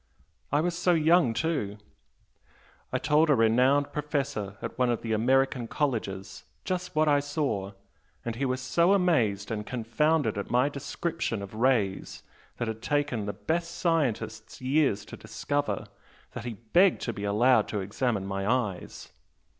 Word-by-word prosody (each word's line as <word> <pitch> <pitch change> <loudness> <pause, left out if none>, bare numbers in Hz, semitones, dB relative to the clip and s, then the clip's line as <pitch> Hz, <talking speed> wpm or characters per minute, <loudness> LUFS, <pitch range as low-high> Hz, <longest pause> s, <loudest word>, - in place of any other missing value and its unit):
I 145 +2 +3
was 175 +1 -1
so 175 0 +2
young, 160 -4 +4
too! 115 -7 -2 1.1
I - - +1
told 155 +1 +3
a 145 - +6
renowned 125 +5 +3
professor 140 -9 -2
at - - -6
one 125 -1 +3
of 120 - -1
the 115 -1 -1
American 130 +2 +2
colleges 110 -9 -3 0.2
just 180 -1 -3
what 155 0 +3
I 145 -1 +4
saw, 140 -10 -2 0.5
and 115 -1 -3
he 130 - -3
was 130 -1 -1
so 170 +9 +3
amazed 120 - +2
and 105 -1 -2
confounded 120 +1 0
at 100 - -5
my 125 +4 +3
description 140 -5 -3
of 100 - -9
rays 110 -5 0 0.3
that 120 - -2
had 110 0 -4
taken 140 -6 -1
the 100 - -2
best 170 - -2
scientists 115 -10 -1
years 130 -5 +1
to - - -9
discover, 145 0 -2 0.5
that - - -7
he 120 - -3
begged 140 - +3
to 115 - -2
be 100 - -6
allowed 110 +3 +3
to 105 - -2
examine 105 +1 -1
my 95 +1 -2
eyes! 105 -8 -3
125 Hz, 155 wpm, -28 LUFS, 110-150 Hz, 1.1 s, a